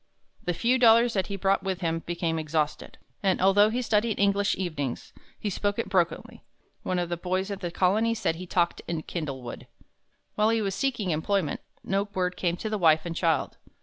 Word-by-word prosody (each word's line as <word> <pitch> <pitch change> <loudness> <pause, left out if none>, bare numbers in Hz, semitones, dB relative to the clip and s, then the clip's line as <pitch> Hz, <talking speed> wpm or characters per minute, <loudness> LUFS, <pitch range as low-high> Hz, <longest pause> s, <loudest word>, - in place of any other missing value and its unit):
The 175 - 0
few 245 +7 +2
dollars 235 0 +6
that 190 -3 0
he 200 - -4
brought 195 0 +1
with 190 -1 -3
him 165 -1 0
became 170 -1 -1
exhausted, 155 -1 -2 0.2
and 190 -2 +2
although 195 +3 +5
he 245 +3 -1
studied 220 -1 +1
English 200 0 +2
evenings, 155 -8 -4 0.3
he 205 - -2
spoke 205 +2 -1
it - - -2
brokenly. 180 -4 -1 0.4
One 185 - -2
of 175 -1 -1
the 175 - -2
boys 185 +3 -2
at 200 - -4
the 175 -3 -3
Colony 210 +6 +2
said 185 -7 -1
he 180 +1 -8
talked 175 -1 +1
in 165 -2 -3
"kindlewood." 135 -8 -6 0.7
While 215 +1 +2
he 225 0 +2
was 200 -3 -1
seeking 235 -7 -1
employment, 165 +2 0 0.2
no 195 +1 0
word 180 -1 0
came 175 -1 -1
to 220 - -4
the 215 - -1
wife 160 -2 +4
and 170 -1 -4
child. 165 -2 0
185 Hz, 195 wpm, -27 LUFS, 170-205 Hz, 0.7 s, dollars